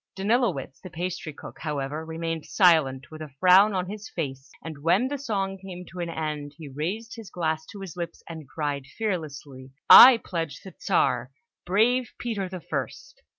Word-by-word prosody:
Danilowitz, 195 Hz, -, 0 dB
the 185 Hz, -, -9 dB
pastry 170 Hz, -1 st, -4 dB
cook, 145 Hz, -, -12 dB
however, 150 Hz, 0 st, -3 dB
remained 165 Hz, 0 st, -4 dB
silent, 155 Hz, -9 st, +3 dB
with 155 Hz, 0 st, -10 dB
a 155 Hz, -, -7 dB
frown 190 Hz, +3 st, +6 dB
on 180 Hz, -1 st, -1 dB
his 210 Hz, +2 st, -8 dB
face; 135 Hz, -5 st, -5 dB, 0.2 s
and 160 Hz, -3 st, -7 dB
when 175 Hz, -, +2 dB
the 285 Hz, -, -3 dB
song 195 Hz, -7 st, -2 dB
came 180 Hz, -2 st, -9 dB
to 180 Hz, +1 st, -11 dB
an 170 Hz, -1 st, -3 dB
end, 150 Hz, -3 st, -4 dB
he 160 Hz, -3 st, -9 dB
raised 190 Hz, -, -4 dB
his 225 Hz, -5 st, -10 dB
glass 160 Hz, -3 st, -2 dB
to 200 Hz, -, -10 dB
his 190 Hz, -4 st, -8 dB
lips, 170 Hz, -1 st, -6 dB
and 160 Hz, -5 st, -9 dB
cried 145 Hz, -3 st, -3 dB
fearlessly, 145 Hz, -10 st, -5 dB, 0.2 s
"I 255 Hz, -1 st, +12 dB
pledge 165 Hz, -8 st, -5 dB
the 190 Hz, -, -11 dB
Czar, 125 Hz, -9 st, +1 dB, 0.4 s
brave 235 Hz, +6 st, +2 dB
Peter 205 Hz, -6 st, -3 dB
the 185 Hz, -1 st, -7 dB
First!" -, -, -6 dB
170 Hz, 175 wpm, -26 LUFS, 150-195 Hz, 0.4 s, I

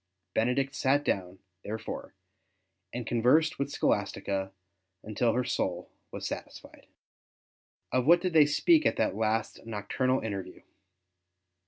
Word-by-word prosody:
Benedict 130 Hz, +4 st, +1 dB
sat 145 Hz, +1 st, +1 dB
down, 95 Hz, -1 st, -1 dB, 0.3 s
therefore, 110 Hz, +2 st, -6 dB, 0.8 s
and 120 Hz, -1 st, -5 dB
conversed 125 Hz, +8 st, +3 dB
v/ith 140 Hz, -, -1 dB
Scholastica 95 Hz, -7 st, -1 dB, 0.5 s
until 110 Hz, +2 st, 0 dB
her 125 Hz, -, +1 dB
soul -, -, -2 dB, 0.2 s
was -, -, -6 dB
satisfied. -, -, -8 dB, 1.0 s
Of 130 Hz, +1 st, +1 dB
what 170 Hz, +2 st, +7 dB
did 180 Hz, -1 st, -2 dB
they 155 Hz, -2 st, +7 dB
speak 315 Hz, -, +4 dB
in -, -, +1 dB
that -, -, 0 dB
last 110 Hz, 0 st, -1 dB
nocturnal 115 Hz, +4 st, -1 dB
interview 100 Hz, -4 st, -6 dB
125 Hz, 120 wpm, -29 LUFS, 110-140 Hz, 1.0 s, what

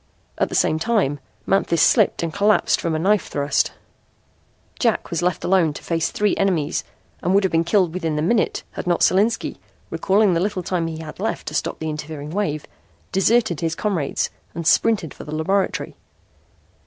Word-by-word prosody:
At -, -, +1 dB
the -, -, -4 dB
same 155 Hz, -, +2 dB
time 170 Hz, -, +1 dB, 0.3 s
Manthis 195 Hz, -3 st, +1 dB
slipped -, -, +4 dB
and 165 Hz, -2 st, -3 dB
collapsed 210 Hz, +1 st, +2 dB
from 165 Hz, -2 st, -1 dB
a -, -, +1 dB
knife 195 Hz, +3 st, +2 dB
thrust. 145 Hz, 0 st, 0 dB, 1.1 s
Jack -, -, 0 dB
was 170 Hz, -, -1 dB
left 175 Hz, -1 st, 0 dB
alone 175 Hz, -5 st, +3 dB
to -, -, -10 dB
face 165 Hz, -1 st, 0 dB
three 210 Hz, -1 st, +1 dB
enemies 180 Hz, -7 st, 0 dB, 0.4 s
and 180 Hz, +2 st, +1 dB
would 200 Hz, -, +4 dB
have 190 Hz, -, +1 dB
been 165 Hz, 0 st, +2 dB
killed 175 Hz, -1 st, +2 dB
within 165 Hz, -4 st, -2 dB
the 150 Hz, -, -1 dB
minute 215 Hz, +6 st, +1 dB
had -, -, -6 dB
not 175 Hz, -1 st, +1 dB
Solinski, 210 Hz, +5 st, +2 dB, 0.3 s
recalling 200 Hz, 0 st, +2 dB
the 165 Hz, -, +1 dB
little 190 Hz, 0 st, -1 dB
time 175 Hz, -2 st, -1 dB
he 160 Hz, -1 st, -5 dB
had 155 Hz, +1 st, -9 dB
left 220 Hz, -, -3 dB
to -, -, -11 dB
stop -, -, -2 dB
the 160 Hz, -, -5 dB
interfering 150 Hz, -1 st, -6 dB
wave, 160 Hz, -6 st, -2 dB, 0.5 s
deserted 195 Hz, -3 st, +2 dB
his 165 Hz, -1 st, -1 dB
comrades 180 Hz, -9 st, -1 dB, 0.2 s
and 170 Hz, -1 st, -4 dB
sprinted 180 Hz, -2 st, +2 dB
for -, -, -10 dB
the 150 Hz, -, -6 dB
laboratory. 190 Hz, +5 st, -1 dB
170 Hz, 180 wpm, -22 LUFS, 160-195 Hz, 1.1 s, slipped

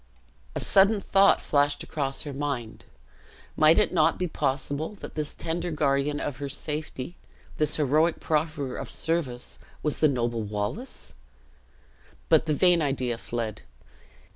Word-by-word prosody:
A -, -, -1 dB
sudden 200 Hz, +2 st, +4 dB
thought 195 Hz, 0 st, +4 dB
flashed 145 Hz, 0 st, +1 dB
across 135 Hz, -3 st, -2 dB
her 145 Hz, -, -6 dB
mind; 135 Hz, -5 st, -4 dB, 0.7 s
might 155 Hz, +1 st, +5 dB
it 210 Hz, -, +3 dB
not 160 Hz, -2 st, +3 dB
be 180 Hz, -, -1 dB
possible 145 Hz, +3 st, -2 dB
that -, -, -9 dB
this 150 Hz, -1 st, -2 dB
tender 170 Hz, +1 st, -3 dB
guardian 145 Hz, -1 st, +1 dB
of 140 Hz, -4 st, -3 dB
her 140 Hz, 0 st, -4 dB
safety, 150 Hz, +1 st, -5 dB, 0.4 s
this 150 Hz, -1 st, +4 dB
heroic 155 Hz, +3 st, +2 dB
profferer 150 Hz, -4 st, -1 dB
of -, -, -5 dB
service, 150 Hz, -7 st, -2 dB, 0.2 s
was 150 Hz, -, 0 dB
the 155 Hz, -, +5 dB
noble 120 Hz, -4 st, -1 dB
Wallace? 105 Hz, -, -4 dB, 1.2 s
But -, -, +4 dB
the 155 Hz, -, +2 dB
vain 175 Hz, +1 st, +4 dB
idea 130 Hz, -5 st, -1 dB
fled. 115 Hz, -4 st, -4 dB
150 Hz, 140 wpm, -27 LUFS, 135-160 Hz, 1.2 s, might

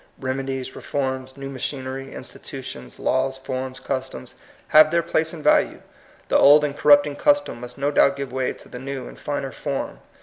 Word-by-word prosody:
Remedies, 130 Hz, 0 st, -3 dB
reforms, 130 Hz, -1 st, -3 dB
new 135 Hz, 0 st, -6 dB
machinery, 135 Hz, 0 st, -4 dB
institu 135 Hz, 0 st, -8 dB
tions, 65 Hz, -, -9 dB
laws, 130 Hz, +1 st, 0 dB
forms, 130 Hz, 0 st, -5 dB
customs, 130 Hz, -, -4 dB, 0.4 s
have 155 Hz, 0 st, +8 dB
their 170 Hz, +1 st, +2 dB
place 160 Hz, 0 st, 0 dB
and 160 Hz, -3 st, -8 dB
value. -, -, +3 dB, 0.5 s
The -, -, +3 dB
old 145 Hz, +2 st, +8 dB
and 145 Hz, -1 st, -1 dB
corrupting 145 Hz, 0 st, +5 dB
custom 290 Hz, -, +2 dB
must 125 Hz, 0 st, -8 dB
no 140 Hz, +1 st, 0 dB
doubt 140 Hz, -1 st, +4 dB
give 140 Hz, -2 st, -5 dB
way 130 Hz, -1 st, -1 dB
to -, -, -16 dB
the 125 Hz, -, -8 dB
new 135 Hz, 0 st, -5 dB
and -, -, -12 dB
finer 140 Hz, -2 st, -3 dB
form. 140 Hz, -1 st, -4 dB
135 Hz, 175 wpm, -23 LUFS, 130-145 Hz, 0.5 s, have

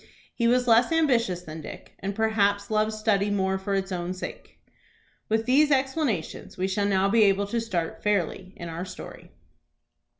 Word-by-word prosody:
He 235 Hz, -, +1 dB
was 250 Hz, +1 st, +2 dB
less 235 Hz, +3 st, +5 dB
ambitious 235 Hz, -, +2 dB
than 155 Hz, -1 st, -8 dB
Dick, -, -, -10 dB
and 195 Hz, +1 st, -4 dB
perhaps 205 Hz, -2 st, +1 dB
loved 215 Hz, 0 st, +2 dB
study 215 Hz, -2 st, +1 dB
more 190 Hz, -1 st, 0 dB
for 195 Hz, +1 st, -2 dB
its 195 Hz, 0 st, -2 dB
own 180 Hz, 0 st, -3 dB
sake. 185 Hz, -, -8 dB, 0.7 s
With 220 Hz, +1 st, +1 dB
these 290 Hz, +5 st, +4 dB
explanations 265 Hz, -, -1 dB
we 185 Hz, +1 st, 0 dB
shall 200 Hz, +1 st, 0 dB
now 195 Hz, -1 st, +2 dB
be 225 Hz, +3 st, +3 dB
able 200 Hz, 0 st, +2 dB
to 230 Hz, +3 st, -2 dB
start 180 Hz, -8 st, -3 dB
fairly 190 Hz, -2 st, -1 dB
in 170 Hz, -, -7 dB
our 165 Hz, +1 st, -5 dB
story. 185 Hz, -, -10 dB
200 Hz, 170 wpm, -26 LUFS, 190-230 Hz, 0.7 s, less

